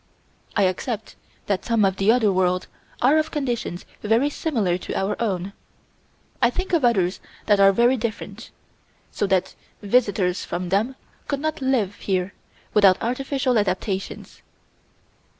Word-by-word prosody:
I 205 - +3
accept 205 +4 -2 0.3
that 195 -2 -1
some 230 -3 +2
of 190 0 0
the 195 +3 +4
other 225 -4 +3
worlds 185 0 +1 0.4
are 285 +5 +5
of 310 - -1
conditions 245 - -3 0.2
very 230 +7 +2
similar 220 - -1
to - - -5
our 195 +2 0
own. 195 -3 -2 0.9
I 235 - +5
think 370 +8 -4
of 330 -5 +3
others 195 -7 +2 0.3
that 205 -1 +3
are 195 0 +7
very 240 +6 +3
different 230 -1 -5 0.6
so 205 - -1
that 190 -2 +1 0.3
visitors 200 -4 +1
from 175 0 -4
them 215 +8 +1 0.3
could 280 -2 -1
not 310 0 -3
live 240 -7 0
here 185 -1 -1 0.4
without 195 -3 +6
artificial 255 0 0
adaptations. 195 0 -3
210 Hz, 140 wpm, -23 LUFS, 190-250 Hz, 0.9 s, are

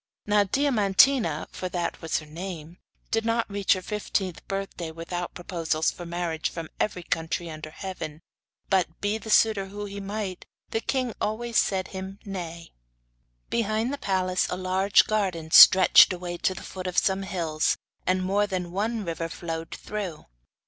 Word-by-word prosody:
Now 210 -1 +3
Diamantina, 215 - +3
for 185 - -5
that 175 -1 -3
was 165 - 0
her 155 - -6
name, 165 +1 -8 0.3
did 225 0 +1
not 230 0 0
reach 200 -1 +2
her 185 -1 -4
fifteenth 195 -3 -2
birthday 195 -4 -4
without 170 +2 -5
proposals 165 -3 -1
for 175 - -9
marriage 170 -2 -2
from 165 -2 -7
every 180 -4 -1
country 165 +1 -2
under 155 0 -7
heaven; 165 -3 -7 0.4
but 180 -4 +1
be 205 +2 -1
the 220 - -9
suitor 210 -2 +4
who 205 +1 -6
he 200 0 -7
might, 200 -2 -5 0.2
the 225 - 0
king 255 -3 -1
always 230 +2 0
said 190 -2 0
him 190 +1 -7
nay. 170 -4 -7 0.8
Behind 225 +3 0
the 285 - -4
palace 185 -1 0
a 180 - -2
large 185 +2 +3
garden 185 -7 -1
stretched 185 +2 +9
away 175 -1 -5
to 185 - 0
the - - -8
foot 185 -1 -6
of 180 - -4
some 190 0 +2
hills, 170 -5 0 0.3
and 185 0 +2
more 200 +2 +1
than 180 -3 -3
one 215 +3 -1
river 165 0 -3
flowed 165 -1 -5
through. 200 -7 -6
185 Hz, 160 wpm, -26 LUFS, 170-205 Hz, 0.8 s, stretched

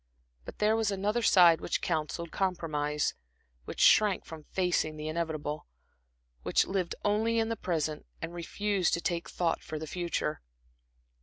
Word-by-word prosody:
But - - -9
there 215 +1 +3
was 225 -2 +1
another 205 +4 0
side 175 -6 +6
which - - -1
counselled 160 0 -2
compromise, 150 -6 -1 0.5
which - - -7
shrank 210 -3 +5
from 160 -2 -10
facing 175 -4 0
the 155 0 -5
inevitable, 155 -2 -3 0.7
which - - +2
lived 190 -3 -2
only 220 +3 +2
in 225 0 +1
the 230 - -1
present 155 -6 -2
and 165 +1 -5
refused 190 +2 0
to 170 - -4
take 170 -1 -2
thought 170 -2 -1
for 155 - -6
the 155 - -5
future. 170 -2 -2
170 Hz, 150 wpm, -30 LUFS, 155-200 Hz, 0.7 s, side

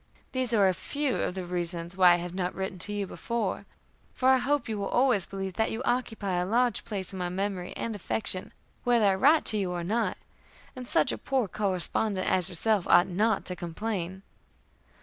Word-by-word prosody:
These 255 -2 -1
are 205 -4 +4
a 185 - +2
few 280 - -2
of 180 - -2
the 185 -1 -4
reasons 175 0 -2
why 180 -2 +7
I 175 0 0
have 175 - -7
not 180 -1 -2
written 190 -1 -4
to 205 - -3
you 205 -1 -2
before, 235 +4 -3 0.5
for 260 - +2
I 260 0 +5
hope 285 +3 0
you 215 -2 -3
will 200 - -2
always 245 -7 +2
believe 195 -1 -5
that 220 +5 0
you 225 +3 -4
occupy 225 -8 -1
a 180 - 0
large 240 +2 +2
place 195 -3 -4
in 190 - -6
my 180 -1 -2
memory 185 -1 -3
and 230 -2 -3
affection, 205 0 -2 0.3
whether 240 -3 +3
I 195 - +4
write 300 +12 +4
to 215 - +2
you 195 -3 -1
or 175 -1 -3
not; 220 +6 -1 0.6
and 250 -1 -8
such 250 - +3
a - - -5
poor 265 -5 0
correspondent 190 +1 -1
as 185 -2 +3
yourself 200 +2 +3
ought 175 - +5
not 210 +4 +1
to 180 - -1
complain. 185 +1 -4
195 Hz, 205 wpm, -28 LUFS, 180-230 Hz, 0.6 s, why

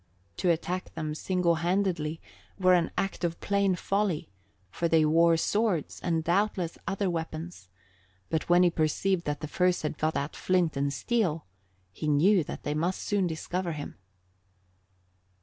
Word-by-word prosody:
To 180 - +1
attack 175 +2 -1
them 155 -2 -3
single 180 +2 +1
handed 175 -4 0 0.4
were 185 -2 +4
an 175 -2 +3
act 195 -2 -2
of 170 -1 -1
plain 200 -2 +1
folly, 195 - -1 0.4
for 170 - -1
they 160 -1 +4
wore 165 +2 +4
swords 205 -2 0
and 165 -2 0
doubtless 180 -1 0
other 195 +1 0
weapons; 165 - -5 0.6
but 160 - -2
when 175 +1 +6
he 175 - +4
perceived 170 +3 0
that 145 0 -2
the 155 - -4
first 180 +2 +1
had 150 -1 -3
got 155 +1 0
out 140 +2 -3
flint 180 -4 +1
and 140 +1 0
steel, 165 - -1 0.5
he 155 - -5
knew 170 +6 +4
that - - -7
they 145 - -1
must 170 +5 -1
soon 200 -3 +1
discover 175 +2 -3
him. 145 -1 -6
170 Hz, 155 wpm, -28 LUFS, 155-185 Hz, 0.6 s, when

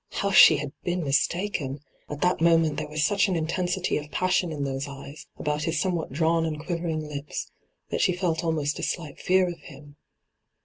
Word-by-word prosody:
How 200 - -1
she - - +8
had 145 -2 -4
been 175 0 -1
mistaken 145 -1 0 0.3
1 150 - -5
At - - -15
that 180 -2 +2
moment 165 -3 +4
there 155 0 -3
was 150 0 -1
such 205 +2 +3
an 185 - 0
intensity 175 +3 -1
of 150 0 -6
passion 180 -1 +1
in 145 -2 -3
those 135 0 -3
eyes, 140 +1 -10
about 150 0 -2
his 165 - 0
somewhat 175 -6 -1
drawn 165 +3 +2
and 155 -2 -2
quivering 165 -2 -3
lips, 145 0 -5 0.4
that - - 0
she 180 - +3
felt 175 -2 0
almost 155 -3 -1
a - - -4
slight 155 -5 -4
fear 185 0 +3
of 175 -1 -6
him. 145 0 -14
160 Hz, 195 wpm, -26 LUFS, 150-175 Hz, 0.4 s, she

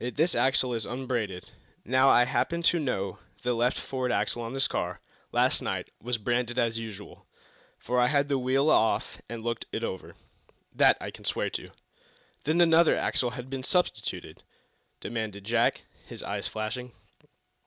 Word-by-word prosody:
Yet 125 - -3
this 165 +4 +3
axle 130 -1 +2
is 115 -2 -2
unbranded! 120 -7 -3 0.3
Now, 130 +2 +4
I 120 - +6
happen 170 +6 0
to 170 +1 +4
know 100 -10 -2 0.2
that 105 - -31
the 125 0 +1
left 120 +2 +1
forward 130 -2 -2
axle 120 - 0
on 115 +2 -5
this 135 0 +3
car - - -3 0.3
last - - +3
night - - -3
was 125 +1 -1
branded 120 +2 -1
as 115 -2 +1
usual, 105 -3 -9 0.5
for 125 0 -1
I 125 - +5
had 140 +1 +2
the 140 -2 +1
wheel 135 +4 +2
off 110 - +2
and 115 -1 -6
looked 115 0 -3
it 115 - -3
over. 95 -4 -5 0.6
That - - +5
I - - -5
can - - -13
swear - - -1
to." - - -5 0.8
"Then 160 +4 +3
another 165 -1 +5
axle 125 - 0
has 125 0 -7
been 130 0 -5
substituted?" 130 - -1 0.6
demanded 110 -4 -4
Jack, 115 +3 +2 0.3
his - - -7
eyes - - -3
flashing. 115 +3 -4
125 Hz, 170 wpm, -28 LUFS, 115-135 Hz, 0.8 s, I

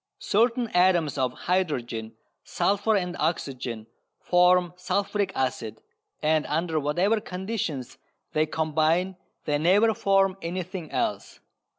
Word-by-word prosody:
Certain 235 - +1
atoms 180 -5 +3
of 130 -2 +1
hydrogen, 125 -11 -2 0.3
sulphur 205 +2 +1
and 180 -2 -2
oxygen 130 -8 -2 0.3
form 180 0 +3
sulphuric 200 +2 -1
acid, 120 -4 -2 0.4
and 155 0 +3
under 160 +1 0
whatever 180 +10 +1
conditions 180 - -4 0.3
they 155 0 +2
combine 160 +4 +1 0.3
they 145 -1 0
never 200 +8 +4
form 195 -3 +2
anything 180 -1 -5
else. - - -3
175 Hz, 105 wpm, -26 LUFS, 150-190 Hz, 0.4 s, never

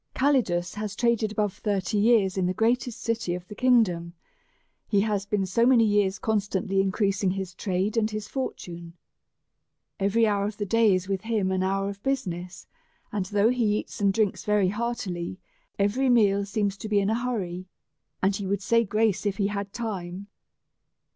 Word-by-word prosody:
Calidus 220 -11 +1
has 210 -1 -5
traded 235 -2 +1
above 210 -2 -1
thirty 205 0 -1
years 205 -4 +3
in 185 -2 +1
the 185 - -1
greatest 235 +2 0
city 230 -6 -1
of 180 0 -8
the - - -8
kingdom; 195 -8 +2 0.7
he 200 -2 +2
has 205 -2 -1
been 200 -2 0
so 195 +5 +1
many 245 -1 +5
years 205 -2 +2
con 220 -1 +1
stantly 195 -1 -1
increasing 195 0 0
his 190 -1 -3
trade 190 +3 -1
and 220 -1 +2
his 215 -1 -5
fortune. 170 -10 -5 1.1
Every 200 +4 +3
hour 200 -2 +1
of 210 0 -4
the 205 - -2
day 225 -1 +4
is 185 0 -3
with 195 -1 -1
him 215 -4 0
an 190 0 0
hour 195 +1 0
of 200 0 -6
business; 180 -10 -3 0.5
and 205 -3 -2
though 205 +2 +3
he 230 -4 +1
eats - - -6
and 200 -1 +4
drinks 210 -1 0
very 210 -3 +2
heartily, 200 -5 -3 0.4
yet 200 - +3
every 255 +6 +1
meal 200 -4 +4
seems 200 -1 -1
to 215 +1 -7
be 205 -1 +3
in 200 +1 +1
a 235 +2 -1
hurry, 185 -7 -3 0.6
and 195 +1 +3
he 200 -1 -4
would 200 0 -1
say 230 +3 +3
grace 215 -1 +1
if 195 -1 -1
he 200 - +1
had 200 -1 -4
time. 200 -4 -5
205 Hz, 185 wpm, -26 LUFS, 190-220 Hz, 1.1 s, many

